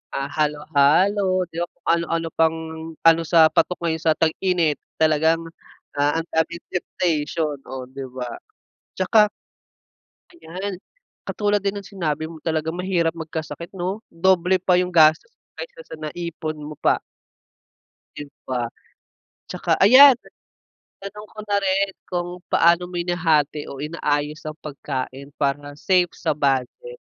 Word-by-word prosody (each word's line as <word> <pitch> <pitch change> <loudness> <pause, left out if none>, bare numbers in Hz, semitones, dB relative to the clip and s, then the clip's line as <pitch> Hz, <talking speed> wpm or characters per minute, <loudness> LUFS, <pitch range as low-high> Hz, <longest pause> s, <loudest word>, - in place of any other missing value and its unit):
ah, 135 0 -2
halo-halo, 160 +6 +2
di 165 - -11
ba? - - -1
Kung - - -42
ano-ano 165 0 +1
pang 160 0 +3 0.4
ano, 165 0 +5
sa 160 -1 +6
patok 180 +3 +1
ngayon 160 -1 -1
sa 160 - +4
tag-init 165 -1 +1 0.2
talagang, 160 +1 +3 0.6
ah, 145 +3 +2
ang 165 - -13
daming 170 +2 -1
temptation. 160 -4 -1
Oh, 130 -1 -7
di 135 +1 -7
ba? 125 -1 -6 0.7
Tsaka 210 +3 +4 1.1
Ayan, 190 - -6 0.4
katulad 205 -1 0
din 200 0 -1
ng 200 - -10
sinabi 160 -6 -3
mo 160 -1 -11
talagang 160 0 -1
mahirap 175 -2 0
magkasakit, 160 0 -6
'no? 190 +4 -3
Doble 185 +1 +2
pa 180 0 +2
yung 180 0 0
gastos 160 - +4 0.2
kaysa - - -9
sa - - -9
naipon 155 0 -5
mo 150 +1 -8
pa. - - +2 1.2
Yun 145 -1 -8 0.2
pa. 120 -2 -2 0.8
Tsaka - - 0
ayan, 260 +6 +9 0.9
tanong 210 +2 -8
ko - - -20
na 205 -1 +1
rin, 195 +1 +1 0.2
kung 175 -1 -2 0.2
paano 170 +1 +4
mo - - -11
hinahati 160 -4 +1
o 140 - -8
inaayos 150 -1 -2
ang 155 +1 -6
pagkain 140 -1 -6
para 145 0 -1
safe 180 0 +2
sa - - -1
budget. 145 - -1
165 Hz, 135 wpm, -22 LUFS, 150-185 Hz, 1.2 s, ayan